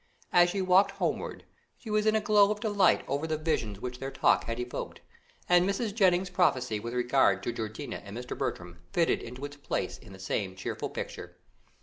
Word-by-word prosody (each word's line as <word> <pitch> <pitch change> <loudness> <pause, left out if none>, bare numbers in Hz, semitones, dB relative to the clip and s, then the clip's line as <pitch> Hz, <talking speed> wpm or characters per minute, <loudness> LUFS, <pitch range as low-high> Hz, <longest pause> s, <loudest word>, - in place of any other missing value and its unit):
As 175 0 +6
she 195 +1 -1
walked 185 +2 +5
homewards, 200 - -3 0.3
she 220 - -8
was 215 0 +2
in 215 - +4
a 220 - +2
glow 205 -1 +5
of 210 0 -1
delight 205 -3 +3
over 140 +4 -1
the 155 -1 -1
visions 115 -11 -2
which 125 +1 -6
their 135 - -4
talk - - +2
had 115 +1 -4
evoked, 125 0 -5 0.5
and 175 0 +5
Mrs. 205 +1 -1
Jennings's 185 -3 +2
prophecy 130 - +2
with 120 +3 -5
regard 120 -6 +3
to 120 - -2
Georgiana 110 -1 -5
and 100 +2 -8
Mr. 125 0 -5
Bertram 90 -1 -4
fitted 170 -1 +2
into 125 +4 -7
its 145 0 -9
place 145 - -3
in 110 - -15
the 95 - -11
same 95 0 -3
cheerful 95 - -4
picture. - - -7
145 Hz, 200 wpm, -29 LUFS, 115-190 Hz, 0.5 s, As